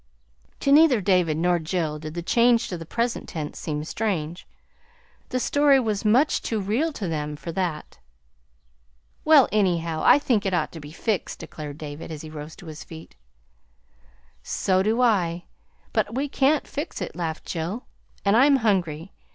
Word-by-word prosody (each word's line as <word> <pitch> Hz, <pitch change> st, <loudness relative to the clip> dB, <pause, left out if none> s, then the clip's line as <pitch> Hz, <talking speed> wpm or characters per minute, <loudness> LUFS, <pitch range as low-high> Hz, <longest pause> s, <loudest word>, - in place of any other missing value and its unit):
To 275 Hz, -, +2 dB
neither 290 Hz, -5 st, +6 dB
David 180 Hz, -5 st, +2 dB
nor 175 Hz, +1 st, +2 dB
Jill 160 Hz, -2 st, -2 dB
did 155 Hz, +1 st, -8 dB
the 170 Hz, -, -4 dB
change 235 Hz, +4 st, +3 dB
to 180 Hz, -, -3 dB
the 165 Hz, -, -9 dB
present 235 Hz, +5 st, -2 dB
tense 150 Hz, -3 st, -5 dB
seem 150 Hz, -1 st, -3 dB
strange. 175 Hz, -3 st, -3 dB, 0.8 s
The 255 Hz, -, -1 dB
story 285 Hz, +2 st, +4 dB
was 215 Hz, -5 st, -1 dB
much 245 Hz, +8 st, +3 dB
too 225 Hz, -, -2 dB
real 225 Hz, +12 st, 0 dB
to 200 Hz, -8 st, -4 dB
them 150 Hz, -2 st, -3 dB
for 150 Hz, +3 st, -7 dB
that. 170 Hz, -3 st, -4 dB, 1.2 s
"Well, 305 Hz, -5 st, +7 dB
anyhow, 170 Hz, -6 st, +1 dB
I -, -, +7 dB
think 245 Hz, -8 st, +1 dB
it 190 Hz, -3 st, 0 dB
ought -, -, -1 dB
to 165 Hz, -, -9 dB
be 145 Hz, -1 st, -10 dB
fixed," 205 Hz, +3 st, -2 dB
declared 150 Hz, -3 st, -8 dB
David, 150 Hz, +1 st, -7 dB
as 155 Hz, -1 st, -7 dB
he 155 Hz, -, -9 dB
rose 155 Hz, +1 st, -8 dB
to -, -, -14 dB
his 155 Hz, -1 st, -8 dB
feet. 160 Hz, -1 st, -12 dB, 1.3 s
"So 185 Hz, -, 0 dB
do 220 Hz, +5 st, +1 dB
I 175 Hz, -7 st, +1 dB, 0.5 s
but -, -, 0 dB
we 275 Hz, +3 st, 0 dB
can't 280 Hz, +1 st, +2 dB
fix 290 Hz, +4 st, -5 dB
it," 180 Hz, -, -5 dB
laughed 165 Hz, -2 st, -4 dB
Jill. 175 Hz, +9 st, -4 dB, 0.4 s
"And 200 Hz, +1 st, +4 dB
I'm 275 Hz, +4 st, +6 dB
hungry. 190 Hz, -, 0 dB
185 Hz, 170 wpm, -24 LUFS, 160-235 Hz, 1.3 s, Well